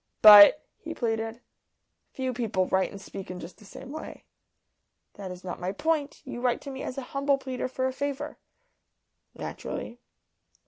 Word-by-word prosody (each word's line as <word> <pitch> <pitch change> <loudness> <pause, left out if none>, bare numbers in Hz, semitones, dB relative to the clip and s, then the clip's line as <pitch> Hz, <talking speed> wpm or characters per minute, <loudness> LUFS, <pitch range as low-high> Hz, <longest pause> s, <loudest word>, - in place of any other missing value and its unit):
"But," 210 +7 +10
he 325 0 -7
pleaded, 225 0 -2 0.7
"few 260 -1 -3
people 220 -6 0
write 190 +1 +1
and 200 - -10
speak 195 0 -9
in 180 0 -6
just 175 +4 -10
the 210 - -16
same 255 +6 -10
way." 315 +1 -8 0.9
"That 195 -2 -8
is 180 0 -9
not 180 - -6
my 180 +1 -2
point. 300 +5 -2
You 245 -2 -6
write 245 -1 +1
to 280 - -7
me 265 0 -7
as 255 - -5
a 270 - -3
humble 280 0 +2
pleader 260 -2 -4
for 260 0 -3
a 260 - -1
favour." 285 +2 -4 1.0
"Naturally." 240 - -6
245 Hz, 170 wpm, -27 LUFS, 200-275 Hz, 1.0 s, But